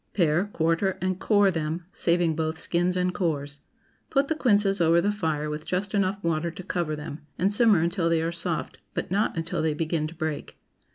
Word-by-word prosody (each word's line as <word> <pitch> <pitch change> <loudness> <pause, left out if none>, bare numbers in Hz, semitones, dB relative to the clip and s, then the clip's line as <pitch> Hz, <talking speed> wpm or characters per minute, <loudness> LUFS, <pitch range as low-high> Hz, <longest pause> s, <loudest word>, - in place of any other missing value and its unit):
Pare, 170 0 +3
quarter, 170 0 0
and 185 0 -1
core 205 -2 +4
them, 160 0 -3
saving 170 -1 +2
both 160 0 -2
skins 175 +2 0
and 180 0 +1
cores. 145 -6 -2 0.5
Put 275 0 +1
the - - +3
quinces 205 - +2
over 165 +1 +5
the 200 +4 +1
fire 160 -7 -1
with 150 0 -4
just 190 +4 -2
enough 200 0 0
water 165 0 0
to 170 +2 -9
cover 170 -3 -2
them, 150 0 -7 0.2
and 195 +3 +1
simmer 210 -5 +5
until 170 0 +1
they 165 -1 +2
are 165 - -1
soft, 170 -1 -3 0.2
but - - -3
not 200 -2 +1
until 165 0 -2
they 155 -1 0
begin 160 -1 -1
to 165 - -11
break. 155 -2 -4
170 Hz, 195 wpm, -26 LUFS, 160-190 Hz, 0.5 s, over